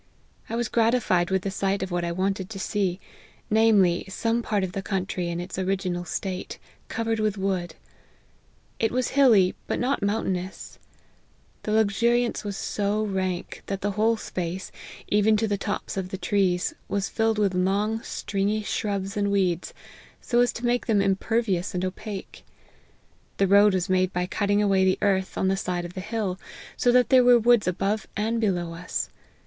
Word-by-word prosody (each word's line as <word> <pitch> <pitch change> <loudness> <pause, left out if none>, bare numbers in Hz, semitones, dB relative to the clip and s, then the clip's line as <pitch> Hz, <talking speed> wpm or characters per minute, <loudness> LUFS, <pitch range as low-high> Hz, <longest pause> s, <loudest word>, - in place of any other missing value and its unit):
I 230 - -2
was 240 -1 0
gratified 225 -7 +2
with 190 -1 0
the 195 - -2
sight 195 0 -1
of 190 - -5
what 175 0 -1
I 170 - -1
wanted 190 +1 -1
to 215 - -7
see; 190 -2 -1 0.5
namely, 210 -5 +4
some 230 +4 0
part 210 -4 -1
of 185 - -2
the 195 - -4
country 185 -2 -2
in 170 0 -3
its 180 +2 -5
original 185 -2 -1
state, 185 0 -4 0.3
cov 230 - -3
ered 225 -1 0
with 215 -1 0
wood; 190 -3 -2 1.0
it 225 - +1
was 250 0 0
hilly, 230 -10 +5
but - - -1
not 265 +3 0
mountainous 190 -3 -3 0.8
The 215 - -3
luxuriance 230 +3 +2
was 205 -2 -4
so 205 +1 -1
rank, 190 -3 -3
that 195 -1 -3
the 205 - 0
whole 220 +3 +2
space, 180 -1 -5 0.4
even 210 +1 +3
to 220 +1 0
the 205 - 0
tops 205 +1 -4
of 185 -1 -3
the 190 - -4
trees, 185 -3 +1
was 200 0 -2
rilled 225 -1 +3
with 200 -3 +2
long 200 +5 0
stringy 205 +1 -2
shrubs 200 -2 -2
and 200 -1 0
weeds, 180 -4 0 0.5
so 240 - 0
as 245 0 +4
to 240 - -5
make 240 0 +1
them 210 -4 +3
im 195 -1 +3
pervious 200 -4 -1
and 180 +1 -1
opaque. 195 +1 -7 0.9
The 195 - +3
road 200 +1 +5
was 180 -2 0
made 185 0 +2
by 180 0 -1
cut 200 +2 -2
ting 205 +1 +3
away 195 -2 +3
the 185 0 +3
earth 190 -2 +1
on 190 - +1
the 190 - +2
side 180 -2 -2
of 175 - -8
the 185 - -5
hill, 200 -3 -3 0.4
so 245 - +3
that 250 0 +4
there 255 -2 +6
were 245 0 +7
woods 235 -2 +4
above 195 +3 -1
and 225 +2 0
below 175 -5 0
us. 170 +2 -4
200 Hz, 185 wpm, -25 LUFS, 185-220 Hz, 1.0 s, were